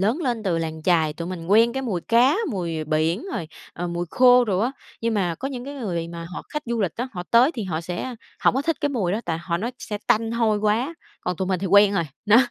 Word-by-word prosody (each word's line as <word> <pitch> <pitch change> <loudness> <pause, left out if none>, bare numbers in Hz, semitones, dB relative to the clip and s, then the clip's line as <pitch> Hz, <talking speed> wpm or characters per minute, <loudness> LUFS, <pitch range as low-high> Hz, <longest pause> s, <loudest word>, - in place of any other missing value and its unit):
lớn 220 +9 +1
lên 240 -6 -1
từ 180 -5 0
làng 160 -1 -4
chài, 160 -3 +3
tụi 170 +3 -6
mình 175 -3 -6
quen 225 +5 +5
cái 265 +1 -3
mùi 205 -9 -2
cá, 240 - +4 0.2
mùi, 170 -6 -2
à, 155 - -3
biển 160 +6 0
rồi, 165 - -3 0.3
à, 175 - -4
mùi 175 0 -3
khô 250 -1 +6
đồ 195 -5 0
á, 230 +5 +1 0.3
nhưng 230 0 0
mà 180 -5 0
có 270 - -3
những 250 -3 -6
cái 285 +1 -7
người 180 -11 -3
mà 170 0 -7
họ - - -5
khách 300 - -4
du 235 -1 -1
lịch 190 -6 -1
á, 245 +3 -3
họ 180 -4 -4
tới 240 +5 +6
thì 225 - -3
họ 165 -4 -2
sẽ 175 +9 -4 0.3
hổng - - +5
có 265 - +1
thích 330 0 0
cái 290 - +1
mùi 215 -11 -1
đó, 215 - -1
tại 165 -1 -2
họ 170 0 -2
nói 230 +8 -3
sẽ 210 - -5
tanh 225 -1 +2
hôi 225 -2 +2
quá, 220 +9 +1 0.3
còn 180 - -2
tụi 185 +2 -2
mình 185 -2 0
thì 195 - -1
quen 200 +2 +6
rồi, 170 - +1 0.2
đó. 210 +2 +7
205 Hz, 275 wpm, -23 LUFS, 170-235 Hz, 0.3 s, đó